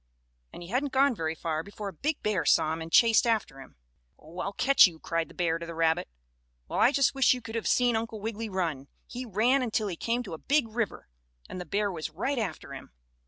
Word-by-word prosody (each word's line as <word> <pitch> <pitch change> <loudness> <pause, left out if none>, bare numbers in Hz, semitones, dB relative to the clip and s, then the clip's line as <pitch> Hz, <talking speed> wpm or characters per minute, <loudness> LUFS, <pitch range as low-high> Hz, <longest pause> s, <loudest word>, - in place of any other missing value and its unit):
And - - -10
he 170 - -11
hadn't 260 +5 -1
gone 275 0 +4
very 165 -6 -3
far 160 -1 -2
before 200 +3 -8
a - - -11
big 295 - -3
bear 205 -5 0
saw 155 +1 +3
him 165 - -5
and 165 0 -7
chased 230 +3 +5
after 215 -12 -1
him. 130 - -15 0.4
"Oh, 165 +4 -12
I'll 195 - -2
catch 270 +2 +6
you!" 170 -3 -9
cried 165 0 -2
the - - -16
bear 165 -2 0
to 170 - -6
the 170 - -7
rabbit. 165 0 +1 0.6
Well, - - -3
I 245 - +5
just 275 -2 +2
wish 270 -1 +4
you 250 - -7
could 225 -1 -8
have 230 -1 -2
seen 245 -2 +3
Uncle 220 -1 -3
Wiggily 220 +1 -4
run! 165 -8 -2 0.2
He 250 +1 -7
ran 235 +6 +2
until 220 -4 -1
he 180 - -4
came 235 +7 -1
to 200 - -8
a 160 - -7
big 285 -3 +1
river, 225 -1 -3 0.4
and 185 - -7
the 180 - -8
bear 205 0 0
was 160 -3 -5
right 235 - -2
after 175 -9 -5
him. 135 - -10
205 Hz, 240 wpm, -28 LUFS, 165-240 Hz, 0.6 s, catch